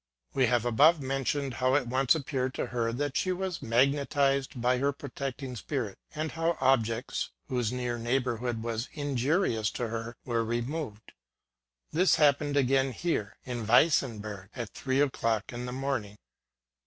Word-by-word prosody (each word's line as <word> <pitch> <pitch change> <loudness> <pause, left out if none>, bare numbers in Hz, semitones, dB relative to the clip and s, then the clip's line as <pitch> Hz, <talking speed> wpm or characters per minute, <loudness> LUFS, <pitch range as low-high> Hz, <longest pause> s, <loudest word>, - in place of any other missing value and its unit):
We 130 -2 +3
have 120 -1 +2
above 145 +8 +5
mentioned 135 0 -1
how 130 +2 +2
it 145 -3 +2
once 130 +4 +3
appeared 130 -3 -2
to - - -1
her 115 -1 -1
that 140 +3 -2
she 185 - +1
was 185 -1 -3
magnetized 140 +2 +2
by 125 +1 +2
her 140 +2 +2
protecting 135 -1 -5
spirit, 120 -4 -4 0.2
and 155 +1 -2
how 165 +1 0
objects, 120 -2 +1 0.2
whose 125 -4 0
near 125 -1 -2
neighbourhood 120 -1 -1
was 115 +1 -3
injurious 140 - +1
to - - -2
I - - +1
er, 115 +1 -4
were 115 -2 0
removed. 120 0 -4 0.8
This 180 +4 +4
happened 145 -1 +3
again 135 0 +3
here 110 -10 -2
(in 120 -4 -4
Weinsberg) 110 - +2
at 120 -4 -5
three 130 0 0
o'clock 115 -6 0
in 120 +1 -5
the - - -4
morning. 130 -6 -3
130 Hz, 155 wpm, -29 LUFS, 120-140 Hz, 0.8 s, above